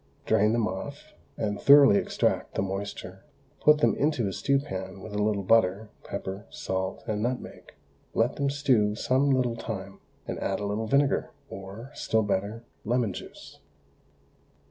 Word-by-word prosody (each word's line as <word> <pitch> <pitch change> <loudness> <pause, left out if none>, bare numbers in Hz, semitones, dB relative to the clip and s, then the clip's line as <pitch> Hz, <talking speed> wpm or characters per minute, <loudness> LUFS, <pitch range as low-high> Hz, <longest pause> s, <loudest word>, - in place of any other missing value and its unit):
Drain 105 +2 +3
them 115 -2 +1
off, 140 +11 -7 0.2
and 105 -2 -2
thoroughly 140 -7 +8
extract - - 0
the - - +1
moisture; 95 -1 -5 0.4
put 150 0 +5
them - - +4
into 145 -7 +1
a 95 - -3
stew 140 +6 +1
pan, 95 -8 -5
with 105 +2 -9
a 105 - -1
little 105 -1 +1
butter, 105 0 +2
pepper, 95 +3 -6
salt, 95 0 -3
and 105 -1 -2
nutmeg. 125 +2 -4 0.4
Let 115 +4 +1
them 140 -1 +1
stew 130 -8 +2
some 130 +5 +2
little 125 -3 +2
time, 100 -4 -6 0.3
and - - -4
add 95 - -1
a 105 - -3
little 105 +2 -2
vinegar, 140 +2 +2 0.2
or, 100 +7 -9
still 110 -5 0
better, 105 +3 -2 0.2
lemon 115 -3 0
juice. - - -11
110 Hz, 155 wpm, -27 LUFS, 100-130 Hz, 0.4 s, thoroughly